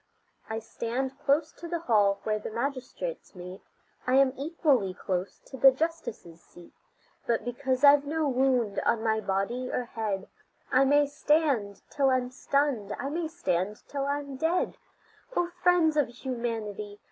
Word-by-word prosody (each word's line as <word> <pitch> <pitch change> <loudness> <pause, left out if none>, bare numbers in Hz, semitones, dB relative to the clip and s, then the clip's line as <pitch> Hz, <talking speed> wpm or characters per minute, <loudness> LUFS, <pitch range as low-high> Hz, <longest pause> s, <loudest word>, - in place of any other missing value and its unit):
I 220 - -2
stand 255 +4 -4
close 295 +2 +2
to 340 - -9
the 340 -1 -3
hall 205 -8 +3
where 215 -1 0
the - - -6
magistrates 265 - -4
meet, 180 +1 -9 0.5
I 255 - +3
am 270 -1 +5
equally 275 - +1
close 185 0 -3
to 265 - -9
the 270 +1 +8
justices' 260 - -4
seat; 175 -1 -16 0.5
But 230 -2 0
because 255 +2 -1
I've 285 0 +8
no 315 0 0
wound 255 -5 +2
on 225 -1 +1
my 220 -1 +2
body 215 +6 -1
or 250 - -2
head 210 -4 -3 0.4
I 265 +1 +5
may 290 +2 +5
stand 285 -8 +1
till 275 -2 +2
I'm 255 -1 +1
stunned, 260 -6 0
I 275 - -3
may 325 +2 -2
stand 210 - -2
till 275 -1 -3
I'm 280 -1 -3
dead. 330 +5 0 0.6
O 350 0 +1
friends 355 -3 +4
of 295 -4 +3
humanity! 230 -5 -4
260 Hz, 155 wpm, -28 LUFS, 215-290 Hz, 0.6 s, the